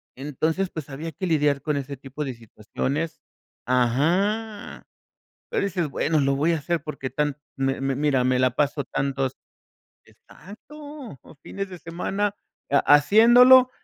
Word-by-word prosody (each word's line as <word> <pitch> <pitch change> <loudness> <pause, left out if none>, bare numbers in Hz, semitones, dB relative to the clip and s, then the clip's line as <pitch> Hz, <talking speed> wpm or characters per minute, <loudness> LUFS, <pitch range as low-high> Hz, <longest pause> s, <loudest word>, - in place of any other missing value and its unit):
Entonces, 155 +7 -2
pues, 155 -5 -8
había 155 +4 -6
que 165 +5 -5
lidiar 145 -4 +1
con 150 -2 -1
ese 140 0 -5
tipo 135 +3 -7
de 130 - -4
situaciones 130 +7 -4 0.5
Ajá. 180 - 0 0.6
Pero - - 0
dices: 180 -5 -1
"Bueno, 155 +3 0
lo 140 -1 +1
voy 155 +5 +1
a - - 0
hacer 165 +2 -2
porque 140 -4 -6
tan, 145 +1 -1 0.2
mi 135 0 -1
mi 135 0 -1
mira, 140 -2 +1
me 130 0 +2
la 130 0 +3
paso 145 0 0
tantos". 135 -1 -2 0.7
Exacto, 280 - -12
los 145 - -16
fines 195 0 -6
de 180 - -9
semana, 195 +5 -3 0.4
ha 140 - +5 0.2
haciéndolo 240 - +7
150 Hz, 145 wpm, -24 LUFS, 135-190 Hz, 0.7 s, haciéndolo